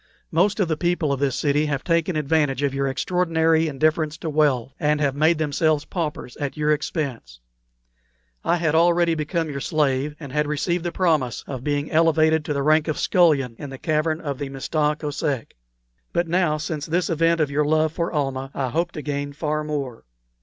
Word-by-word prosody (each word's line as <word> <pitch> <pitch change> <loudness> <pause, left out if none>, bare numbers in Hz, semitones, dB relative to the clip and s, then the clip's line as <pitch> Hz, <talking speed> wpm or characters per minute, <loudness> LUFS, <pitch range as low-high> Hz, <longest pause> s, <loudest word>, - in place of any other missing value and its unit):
Most 195 +6 +2
of 195 - +2
the 160 -1 -1
people 170 -4 0
of 135 - -3
this 135 -2 0
city 150 +1 +1
have 140 -2 -2
taken 170 +1 +1
advantage 150 -2 +1
of 140 -1 +1
your 140 0 0
extraordinary 165 +1 +1
indifference 155 +1 0
to 160 -1 -4
wealth, 135 -4 +1
and 150 0 +1
have 140 -2 +1
made 155 +3 +3
themselves 155 0 +1
paupers 150 -8 -4
at 145 +1 -4
your 150 0 +1
expense. 140 - -4 1.0
I - - +2
had 165 -3 0
already 170 +1 +4
become 160 +1 -2
your 140 - -4
slave, 145 -1 0
and 140 -4 -8
had 150 +2 0
received 165 +4 -1
the 175 - -1
promise 155 - 0
of 130 -3 -6
being 145 0 -1
elevated 160 -1 +3
to 150 - -1
the 140 -1 -1
rank 155 +1 +3
of 155 - -1
scullion 145 -9 +3
in 145 - -6
the 135 - -8
cavern 155 +2 0
of 140 -3 -4
the 140 - -4
Mista 150 +3 0
Kosek. 145 -4 -3 0.6
But 170 0 +1
now, 170 -2 +1
since 150 0 -4
this 170 +2 0
event 165 +1 +2
of 150 -3 +1
your 150 +2 +2
love 155 +1 +2
for 170 0 -2
Almah, 135 -3 -2
I 130 -2 -1
hope 170 +6 -1
to 150 - -6
gain 145 -1 -3
far 150 0 -2
more. 140 - -4
150 Hz, 195 wpm, -23 LUFS, 140-165 Hz, 1.0 s, already